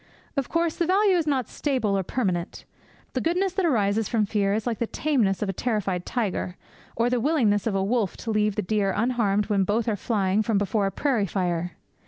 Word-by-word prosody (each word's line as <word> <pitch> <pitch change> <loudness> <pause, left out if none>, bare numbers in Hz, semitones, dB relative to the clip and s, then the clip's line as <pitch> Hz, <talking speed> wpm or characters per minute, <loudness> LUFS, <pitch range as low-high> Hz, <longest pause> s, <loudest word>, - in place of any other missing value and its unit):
Of 275 -3 -1
course, 335 -1 0
the 340 - 0
value 390 +1 +4
is 335 -3 0
not 265 -6 +1
stable 255 -9 -1
or 195 - +1
permanent. 185 -4 -2 0.5
The - - -1
goodness 360 +3 0
that 375 -2 +1
arises 215 -5 +1
from 225 -3 +2
fear 200 -1 0
is 220 - -2
like 235 -3 -2
the 235 - 0
tameness 225 -12 0
of - - -2
a - - -1
terrified 195 -5 -2
tiger, 200 -6 -2 0.4
or 230 +1 +2
the 245 0 +1
willingness 230 -7 +2
of 210 - 0
a 190 - +1
wolf 215 -2 0
to 225 - -1
leave 210 -1 +1
the 210 - -1
deer 200 0 0
unharmed 215 -3 +1
when 200 -2 +1
both 215 +4 0
are 220 - +1
flying 200 -1 0
from 220 -1 +1
before 205 0 +1
a - - -2
prairie 245 -7 0
fire. 175 -2 -1
215 Hz, 215 wpm, -25 LUFS, 195-255 Hz, 0.5 s, value